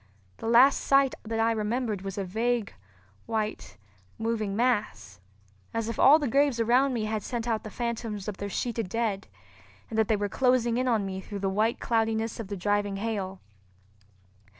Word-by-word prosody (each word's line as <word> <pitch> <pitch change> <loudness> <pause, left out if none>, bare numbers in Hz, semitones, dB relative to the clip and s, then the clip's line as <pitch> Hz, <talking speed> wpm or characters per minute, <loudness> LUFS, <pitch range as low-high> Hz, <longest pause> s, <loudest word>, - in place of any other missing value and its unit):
The - - -6
last 245 +4 +6
sight 275 -1 +3
that 225 0 -4
I 225 +1 +3
remembered 220 -1 -1
was 195 0 -6
a 200 - -1
vague, 225 +3 -1 0.5
white, 215 - -3 0.4
moving 220 -3 -2
mass, 210 - -1 0.6
as 225 0 -1
if 230 - -5
all 285 +3 +8
the 295 -3 -2
graves 275 0 +2
around 250 +4 +3
me 220 -2 -1
had 215 0 -2
sent 240 +2 -4
out 225 -2 -1
the 215 - -7
phantoms 230 -4 -4
of 205 -2 -4
their 200 - -4
sheeted 225 0 -2
dead, 220 -2 -2 0.6
and 220 - -1
that 220 - +3
they 220 - +3
were 205 0 -1
closing 250 +1 +2
in 255 - 0
on 225 -5 +2
me 190 0 -4
through 205 +1 -7
the 195 0 -1
white 215 +4 +1
cloudiness 225 -1 0
of 225 - -5
the 200 0 -5
driving 205 +1 0
hail. 195 -3 -3
225 Hz, 180 wpm, -27 LUFS, 205-235 Hz, 0.6 s, all